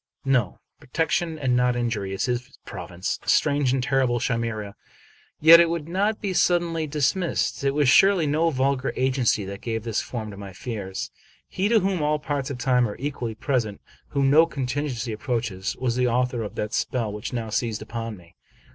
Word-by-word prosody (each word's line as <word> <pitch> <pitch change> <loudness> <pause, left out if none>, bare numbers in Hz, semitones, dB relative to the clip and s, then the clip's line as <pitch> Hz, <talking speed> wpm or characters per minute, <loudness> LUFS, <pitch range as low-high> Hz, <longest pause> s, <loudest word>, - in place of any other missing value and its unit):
No; 125 -8 +1 0.2
protection, 160 +3 -1
and 130 -4 +1
not 125 0 +2
injury, 115 -5 -2
is 95 - -1
his 125 -1 -3
province. 90 +1 -5
Strange 145 -3 +2
and 130 -1 0
terrible 130 -2 +1
chimera! 115 -4 -2 0.7
Yet 165 +2 +9
it 170 -1 +5
would 165 -2 -3
not 200 +5 0
be 195 -2 -2
suddenly 170 -3 +1
dis 145 +1 +1
missed. 180 -6 -1
It 140 0 +1
was 145 -2 +3
surely 190 +5 +5
no 155 +3 +2
vulgar 135 -2 0
agency 130 -5 +1
that 100 +1 -7
gave 110 -2 -3
this 115 -2 -1
form 110 -4 -6
to 100 - -10
my 100 -1 -8
fears. 95 -3 -5 0.4
He 195 +3 -1
to 225 -2 +4
whom 190 -3 0
all 150 +1 +2
parts 145 -2 -3
of 140 - -4
time 125 -1 +2
are 105 - -7
equally 125 -5 -4
pres 130 +2 0
ent, 100 - -9 0.3
whom 140 -1 +1
no 160 +3 +6
contingency 130 -4 -3
approaches, 110 -5 -3
was 125 -2 -1
the 125 0 +2
author 125 0 0
of 105 - -6
that 105 - -3
spell 115 -5 -1
which 105 +3 -5
now 115 -3 -4
seized 110 0 -1
upon 115 -2 -5
me. 85 -1 -18
125 Hz, 190 wpm, -24 LUFS, 115-150 Hz, 0.7 s, Yet